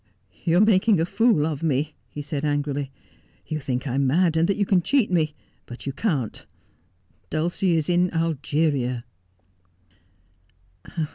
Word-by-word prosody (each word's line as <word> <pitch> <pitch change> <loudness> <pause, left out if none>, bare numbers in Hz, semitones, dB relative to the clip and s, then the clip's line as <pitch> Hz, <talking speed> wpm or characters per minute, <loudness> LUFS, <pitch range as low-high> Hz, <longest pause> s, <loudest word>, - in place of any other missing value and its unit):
' - - -32
You 170 +1 +3
are - - +6
making 210 -2 +4
a 165 - +2
fool 200 -4 +3
of 155 -3 -3
me,' 150 -1 0 0.2
he 145 - -6
said 145 0 -4
angrily. 145 -2 -1 0.3
' - - -36
You 155 -1 -3
think 130 -2 -3
I 130 - -2
am 135 0 +2
mad 165 +4 +3
and 165 +1 +3
that 200 - +1
you 205 - +1
can 190 -2 +3
cheat 255 +1 +2
me, 155 -4 +1 0.3
but 120 - -9
you 140 - -3
can't. 145 - -2 0.9
Dulcie 170 +3 0
is 160 -2 +1
in 180 +1 +3
Algeria.' 145 -6 0
155 Hz, 160 wpm, -24 LUFS, 140-180 Hz, 0.9 s, are